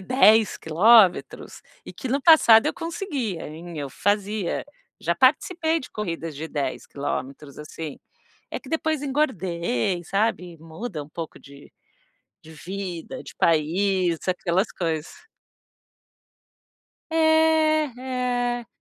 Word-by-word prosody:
10 220 -1 +4
quilômetros, 190 +4 +3 0.2
e - - -8
que 260 - -6
no 275 +3 0
passado, 245 -8 +7
eu - - 0
conseguia, 320 - -4
hein, 165 +1 -9
eu 140 -1 -4
fazia, 205 +3 -1 0.4
já 170 +1 0
participei 320 - +2
de 260 - -9
corridas 165 -6 -5
de 160 +3 -6
10 140 -4 -3
quilômetros, 140 0 -5
assim, 150 0 -7 0.5
é - - -4
que - - -14
depois 315 -2 -1
engordei, 185 - -1
sabe, 190 -3 -1
muda 165 +2 -7
um - - -17
pouco 160 +1 -7
de 140 0 -16 0.7
de 160 - -14
vida, 185 - -6
de - - -12
país, 175 +2 +1
aquelas 185 +2 0
coisas. 160 -2 -3 2.0
É, 315 -1 +3
é. 245 -2 -2
195 Hz, 115 wpm, -24 LUFS, 165-255 Hz, 2.0 s, passado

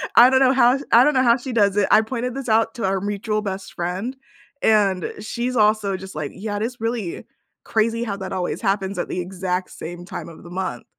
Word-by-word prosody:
I 245 +2 +9
don't 260 0 +4
know 265 0 +5
how 255 0 +5
sh - - -8
I 235 +2 +8
don't 300 +1 +3
know 260 - +4
how 235 +1 +5
she 260 +1 -6
does 200 -3 +3
it, 200 - +3
I 215 - +7
pointed 250 +2 -4
this 270 -4 -5
out 225 +1 +2
to 230 -5 -2
our 190 0 0
mutual 210 +1 -2
best 195 -2 -5
friend, 185 +9 -3 0.5
and 200 -5 +2
she's 245 +3 -3
also 210 -3 +2
just 190 +1 -10
like, 145 -2 -4
"Yeah, 205 +1 -4
it - - -4
is 240 +1 -4
really 225 -6 -3 0.4
crazy 230 +1 +1
how 200 -4 -3
that 190 0 -6
always 180 -1 -2
happens 195 -2 -1
at - - -2
the 180 - -3
exact 180 0 -3
same 175 +2 -8
time 175 -3 -7
of 165 - -13
the 170 - -11
month," 180 -10 -4
210 Hz, 235 wpm, -22 LUFS, 190-235 Hz, 0.5 s, I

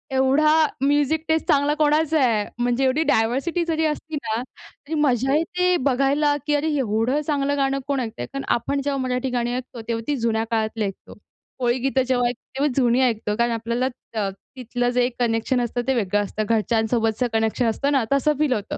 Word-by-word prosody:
एवढा 270 +4 +4 0.3
music 290 +3 +2
taste 320 0 +1
चांगला 290 -1 +3
कोणाचा 305 +1 +3
आहे. 215 -4 +1 0.2
म्हणजे 245 +2 +1
एवढी 265 +4 +2
डायव्हर्सिटी 275 +8 +1
जरी 320 -1 0
असती 310 +1 -3
ना 230 -5 -2
तरी 285 +3 -13
मजा 270 -3 +2
येते 360 +3 +1
बघायला, 280 +3 +2
की 295 - +2
अरे, 290 +2 0
एवढं 235 +4 0
चांगलं 285 -1 -1
गाणं 275 0 +1
कोण 280 -2 0
ऐकतं 230 -2 -5
आहे - - -4
कारण 275 0 -4
आपण 275 +4 -2
जेव्हा 280 0 -1
मराठी 255 +1 -1
गाणी 240 -1 -1
ऐकतो 250 -1 -6
तेव्हा 230 -1 -2
ती 295 - +1
जुन्या 225 -2 0
काळातली 220 -1 0
ऐकतो. 195 - -7 0.5
कोळीगीतं 255 +2 +1
जेव्हा 245 -2 +2
ऐकतो 245 +1 -6
तेव्हाच 280 -2 0
जुनी 245 -1 +3
ऐकतो 210 -3 -2
कारण 235 0 +2
आपल्याला 235 +2 -1 0.3
अ, 205 -3 0 0.3
तिथलं 245 -1 -2
जे 245 0 +2
कनेक्शन 240 +1 +1
असतं 240 +1 -2
ते 265 - +3
वेगळं 205 -2 +1
असतं 215 +2 -3
घरच्यांसोबतचं 225 +1 +1
कनेक्शन 225 +2 +1
असतं 275 +6 0
ना 270 -4 +2
तसं 290 +2 +2
फील 300 -4 +2
होतं. 210 -4 -4
255 Hz, 185 wpm, -23 LUFS, 230-285 Hz, 0.5 s, एवढा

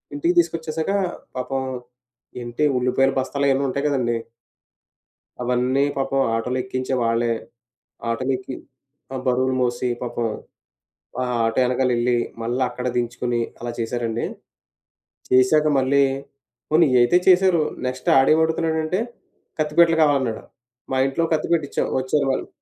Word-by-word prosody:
ఇంటికి 335 +5 +1
తీసుకొచ్చేశాక, 160 - -1 0.5
పాపం 135 +1 -2 0.8
ఏంటి 120 +4 -3 0.2
ఉల్లిపాయలు 130 +2 +2
బస్తాలయన్నీ 140 +1 +1
ఉంటాయి 140 +3 -2
కదండీ. 120 -5 0 1.3
అవన్నీ 125 +2 +1
పాపం 135 0 0
ఆటోలో 125 +3 -1
ఎక్కించే 130 0 -3
వాళ్ళే, 115 0 +1 0.8
ఆటోలో 130 +3 -1
ఎక్కి 130 0 -7 0.6
ఆ! - - -2
బరువులు 130 +1 +2
మోసి 120 0 0
పాపం, 120 -1 -2 1.0
ఆ - - +1 0.2
ఆటో 115 +2 +1
యెనకాల 125 +1 +1
యెళ్లి, 120 +1 +1 0.2
మళ్ళా 120 +3 -1
అక్కడ 125 +1 -4
దించుకొని 120 0 -1 0.2
అలా 120 0 -4
చేశారండి. 115 0 -2 1.0
చేశాక 130 +5 +4
మళ్ళీ 140 +2 +3 0.7
పోనీ 160 +2 +5
ఇయి 125 - +5
అయితే 120 +9 +5
చేశారు. 185 -3 +5 0.3
నెక్స్ట్ 130 0 -6
ఆడేమడుగుతున్నాడంటే, 160 +4 +2 0.6
కత్తిపీటలు 160 +2 +3
కావాలన్నాడు. 135 -6 +1 0.5
మా 130 - +1
ఇంట్లో 135 +5 -1
కత్తిపీట 160 +1 +1
ఇచ్చాం. - - -1
వచ్చారు 130 +3 0
వాళ్ళు 130 - -2
130 Hz, 115 wpm, -22 LUFS, 125-150 Hz, 1.3 s, పోనీ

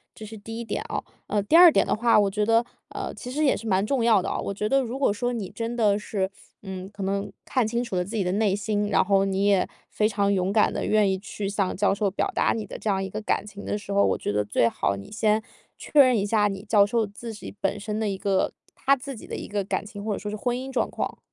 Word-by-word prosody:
这 220 - -9
是 220 +1 -9
第 225 +2 -8
一 - - -3
点 225 - -3
哦。 - - -2 0.2
呃， 205 -1 0
第 205 - +2
二 350 0 +10
点 - - +3
的 - - +1
话， 230 +1 +4
我 205 -1 +3
觉 210 +1 0
得， 230 +2 +3 0.2
呃， - - -5
其 250 - -8
实 295 +5 -1
也 280 - +4
是 230 - -7
蛮 195 -1 +2
重 255 +1 0
要 220 -4 +5
的 - - -3
哦。 - - -2
我 - - -3
觉 210 +2 -2
得 270 +2 +3
如 250 0 -4
果 270 -6 +2
说 245 +4 -2
你 210 -6 -4
真 230 +1 -4
的 210 -3 +3
是， 195 -2 -2 0.3
嗯， 190 -1 -6
可 200 - -6
能 195 +1 -2
看 255 -5 +1
清 235 +2 -1
楚 235 -6 -5
了 180 - +1
自 210 +5 -6
己 210 - +1
的 180 - -1
内 205 -1 +2
心， 205 0 -1
然 - - +3
后 195 -1 +3
你 195 0 0
也 200 -2 +3 0.2
非 210 - +2
常 200 -2 +1
勇 190 0 0
敢 215 -1 +4
地 - - -2
愿 210 -2 +3
意 190 - 0
去 200 0 -5
向 200 -2 -1
教 200 +1 +2
授 200 0 0
表 190 - -1
达 - - +2
你 220 -2 -4
的 - - -8
这 220 - -2
样 195 -1 +1
一 190 - -4
个 210 - -4
感 205 - -1
情 205 -1 -10
的 - - -1
时 205 -1 -8
候， 200 0 +4
我 - - +1
觉 - - -3
得 105 0 0
最 110 +3 +2
好 100 - -1
你 100 - -10
先 215 0 +1 0.3
确 300 - 0
认 255 -4 +7
一 200 - 0
下 210 0 +2
你 195 -1 -5
教 210 -2 +4
授 225 +2 +1
自 220 +3 -8
己 210 - -9
本 195 - 0
身 210 +1 -3
的 220 - 0
一 195 - -3
个 190 -1 0 0.2
他 275 - +3
自 270 +1 -7
己 - - -11
的 - - -5
一 - - -6
个 205 -1 -1
感 200 - -2
情， 205 -1 -8
或 215 0 -1
者 - - -4
说 210 - -5
是 210 - -4
婚 245 +3 -1
姻 265 +1 -6
状 260 - 0
况。 - - -4
210 Hz, 315 characters per minute, -25 LUFS, 195-225 Hz, 0.3 s, 二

